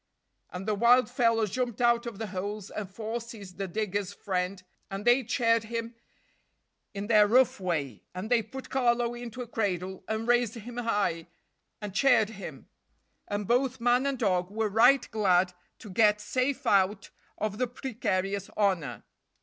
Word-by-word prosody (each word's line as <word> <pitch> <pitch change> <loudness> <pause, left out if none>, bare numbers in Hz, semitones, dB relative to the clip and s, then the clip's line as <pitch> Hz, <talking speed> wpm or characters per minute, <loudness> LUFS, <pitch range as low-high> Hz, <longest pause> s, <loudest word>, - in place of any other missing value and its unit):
And 185 +3 -7
the 215 - +2
wild 235 +4 +4
fellows 230 -4 +2
jumped 245 -1 -2
out 235 0 +3
of 230 -4 -6
the 220 - -4
holes, 200 +2 -4
and 205 -3 -5
four 225 +4 -4
seized 205 -5 -11
the 195 - -2
diggers' 205 0 -2
friend, 185 -1 -3 0.3
and 195 +1 -5
they 245 +2 +5
chaired 230 -1 +2
him 230 +1 -4 1.0
in 200 +1 -3
their 210 -1 +5
rough 250 +2 +4
way, 155 - -2
and 190 +5 -5
they 240 -2 +5
put 260 +5 -9
Carlo 240 -2 +2
into 240 0 -6
a - - -11
cradle, 190 -5 -2
and 220 +1 -2
raised 240 -2 +2
him 235 +2 -9
high, 205 -8 -1 0.5
and 210 -3 -6
chaired 225 -1 +4
him; 200 -3 -9 0.6
and 205 0 -3
both 255 +1 +1
man 245 +3 +3
and 275 -1 -1
dog 185 -5 +1
were 215 +1 -1
right 245 +5 +5
glad 185 -4 +2 0.2
to 210 - -11
get 210 +1 +4
safe 255 +5 -1
out 200 -2 +2 0.3
of 210 0 -3
the 255 - +1
precarious 200 -6 -2
honor. 170 - 0
220 Hz, 165 wpm, -28 LUFS, 195-240 Hz, 1.0 s, they